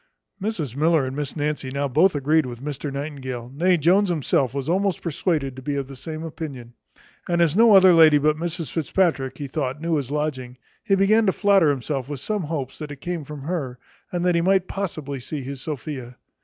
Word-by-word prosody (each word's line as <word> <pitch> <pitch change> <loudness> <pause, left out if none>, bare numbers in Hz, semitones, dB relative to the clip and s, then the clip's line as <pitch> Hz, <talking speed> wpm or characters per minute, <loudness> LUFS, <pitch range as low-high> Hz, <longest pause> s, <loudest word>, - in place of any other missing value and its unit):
Mrs 175 - -3
Miller 155 -1 +3
and 130 +1 -5
Miss 145 -1 -4
Nancy 150 -3 -2
now 140 +2 -1
both 155 +7 +3
agreed 145 +1 +2
with 120 -1 -7
Mr 145 +1 -5
Nightingale; 130 -4 -5
nay, 175 +5 +3
Jones 185 +6 +3
himself 140 -6 +1
was 140 0 -4
almost 190 +2 0
persuaded 155 -5 -1
to 130 - -9
be 145 +2 -3
of 140 -1 -3
the 135 - -10
same 155 +4 -6
opinion. 140 -7 -7 0.6
And 170 0 +1
as 170 -2 +3
no 225 -1 +7
other 190 -1 +8
lady 160 -3 +7
but 150 +1 +2
Mrs 165 0 -4
Fitzpatrick, 160 -6 0
he 145 - -5
thought, 135 0 -3
knew 165 0 0
his 135 -3 -3
lodging, 140 -4 -3 0.3
he 195 - +3
began 215 +3 +3
to - - +5
flatter 195 -5 +4
himself 135 -1 -2
with 145 -3 -4
some 210 - -2
hopes, 150 -5 -4
that 150 -2 -6
it 145 -2 -9
came 175 -1 -4
from 145 -1 -8
her, 145 -6 -3 0.3
and 175 0 -1
that 180 - +3
he 170 - +2
might 190 +1 +2
possibly 155 -8 -4
see 140 +3 -5
his 135 0 -6
Sophia. 130 -4 -6
150 Hz, 210 wpm, -23 LUFS, 135-170 Hz, 0.6 s, other